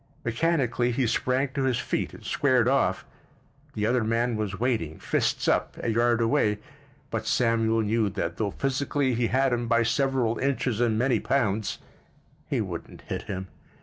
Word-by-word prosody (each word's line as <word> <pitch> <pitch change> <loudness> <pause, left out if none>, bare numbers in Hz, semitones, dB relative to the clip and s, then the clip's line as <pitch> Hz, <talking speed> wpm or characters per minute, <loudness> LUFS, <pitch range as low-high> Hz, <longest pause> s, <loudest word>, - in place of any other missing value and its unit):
Mechanically 125 -2 +1
he 125 +1 0
sprang 130 +4 +1
to 135 -1 -2
his 130 -3 +1
feet - - -2
and - - -13
squared 130 -4 +2
off. 135 +1 +1 0.7
The 105 - 0
other 120 +1 +2
man 115 +2 +1
was 105 -2 -3
waiting, 110 -11 -1
fists - - 0
up, - - +1
a - - -2
yard 120 +1 +2
away, 105 -2 +2 0.5
but - - -3
Samuel 115 -2 +2
knew 110 0 +1
that 85 -2 -3
though 105 -1 0
physically 135 +2 0
he 120 0 +1
had 130 +1 +2
him 120 0 -1
by 115 0 +3
several 125 -1 +1
inches 125 -4 0
and 115 -3 +2
many 125 +3 +2
pounds, 110 -6 0 0.7
he - - +1
wouldn't - - -6
hit - - -5
him. 95 0 -3
120 Hz, 165 wpm, -26 LUFS, 110-130 Hz, 0.7 s, by